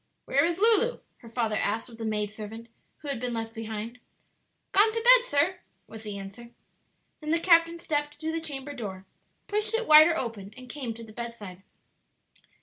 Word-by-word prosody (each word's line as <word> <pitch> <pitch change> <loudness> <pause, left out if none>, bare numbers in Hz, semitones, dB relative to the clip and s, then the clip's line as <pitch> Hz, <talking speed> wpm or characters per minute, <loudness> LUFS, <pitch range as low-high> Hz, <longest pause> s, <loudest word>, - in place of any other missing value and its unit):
"Where 280 +1 +2
is 340 +1 0
Lulu?" 455 +3 +4 0.2
her 230 - -14
father 225 -2 -1
asked 220 +3 -1
of 230 -2 -14
the 225 - -4
maid 210 -1 -1
servant 220 +2 -9 0.3
who - - -7
had 275 -4 -2
been 245 -1 -3
left 225 0 -4
behind. 225 +1 -6 0.7
"Gone 420 +3 +5
to 455 - -2
bed, - - +7
sir," 360 -1 +1 0.3
was 220 -1 -11
the 210 -2 -6
answer. 200 +5 -10 0.7
Then 305 - -7
the 330 - +3
captain 335 -1 +4
stepped 295 -3 -3
to 320 +1 -3
the 325 0 -3
chamber 290 -2 -5
door, 195 -7 -7 0.4
pushed 425 +2 -1
it 460 0 -1
wider 310 +2 +8
open, 215 -4 -5
and 255 0 -11
came 250 -4 -5
to 230 - -10
the 220 -1 -13
bedside. 215 -6 -8
250 Hz, 185 wpm, -27 LUFS, 225-330 Hz, 0.7 s, wider